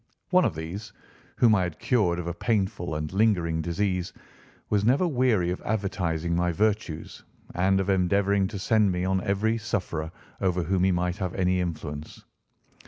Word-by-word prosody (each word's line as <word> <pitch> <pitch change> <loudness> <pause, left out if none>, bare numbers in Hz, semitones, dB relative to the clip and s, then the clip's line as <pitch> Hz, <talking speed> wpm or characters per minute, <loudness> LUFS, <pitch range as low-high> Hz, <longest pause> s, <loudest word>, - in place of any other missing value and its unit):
One 185 -1 +5
of 90 - 0
these, 95 +6 -6 0.4
whom 115 -3 +5
I 100 - +3
had 85 -4 -3
cured 100 -9 +1
of 90 - -4
a 85 - -2
painful 95 -4 -1
and 75 +2 -4
lingering 90 -6 +2
disease, 90 +2 -1 0.6
was 105 -1 +2
never 135 - +3
weary 120 - +2
of 90 - -4
advertising 85 -5 -1
my 90 0 +1
virtues 100 -4 -1 0.3
and 95 +2 +2
of 95 - -1
endeavouring 95 +1 +2
to 100 - -6
send 105 +1 +2
me 90 0 -1
on 95 0 +1
every 110 +4 0
sufferer 85 -7 -3 0.3
over 90 -2 +1
whom 90 +2 +1
he 95 - +3
might 90 0 0
have 95 -4 -3
any 90 -1 +1
influence. 80 -4 -5
95 Hz, 170 wpm, -26 LUFS, 85-105 Hz, 0.6 s, One